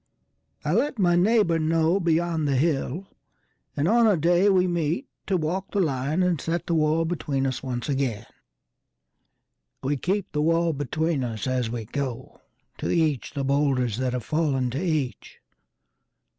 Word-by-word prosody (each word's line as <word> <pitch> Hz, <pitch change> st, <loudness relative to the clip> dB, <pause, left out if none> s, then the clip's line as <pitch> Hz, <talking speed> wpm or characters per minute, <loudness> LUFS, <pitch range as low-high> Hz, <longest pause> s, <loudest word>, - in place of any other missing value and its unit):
I -, -, +1 dB
let 290 Hz, -3 st, +1 dB
my 175 Hz, -4 st, +3 dB
neighbour 185 Hz, -2 st, +3 dB
know 165 Hz, +3 st, +2 dB
beyond 165 Hz, -2 st, +1 dB
the 140 Hz, -, +1 dB
hill; 150 Hz, +4 st, 0 dB, 0.7 s
And 145 Hz, +3 st, +1 dB
on 230 Hz, +3 st, +5 dB
a 205 Hz, -4 st, +4 dB
day 175 Hz, +5 st, +3 dB
we 185 Hz, -2 st, +4 dB
meet 175 Hz, -, -1 dB, 0.2 s
to 190 Hz, -, +2 dB
walk 180 Hz, +4 st, -2 dB
the 205 Hz, -, -1 dB
lineAnd 155 Hz, +2 st, 0 dB
set 170 Hz, +1 st, -2 dB
the 170 Hz, -, -1 dB
wall 160 Hz, +1 st, +2 dB
between 145 Hz, -5 st, -2 dB
us 130 Hz, -2 st, -2 dB
once 125 Hz, -3 st, -4 dB
again. 135 Hz, -7 st, -1 dB, 1.6 s
We 140 Hz, +2 st, 0 dB
keep 190 Hz, +7 st, -2 dB
the 150 Hz, -, -1 dB
wall 165 Hz, +1 st, +2 dB
between 145 Hz, +1 st, -1 dB
us 115 Hz, -4 st, -4 dB
as 130 Hz, -3 st, 0 dB
we 115 Hz, -1 st, -4 dB
go. 130 Hz, 0 st, -5 dB, 0.4 s
To -, -, -2 dB
each 155 Hz, -6 st, 0 dB
the 140 Hz, -, -1 dB
boulders 135 Hz, -5 st, +1 dB
that 130 Hz, -1 st, -1 dB
have 125 Hz, -2 st, -3 dB
fallen 140 Hz, -6 st, 0 dB
to 140 Hz, +8 st, -3 dB
each. 155 Hz, -7 st, -2 dB
155 Hz, 155 wpm, -25 LUFS, 135-175 Hz, 1.6 s, on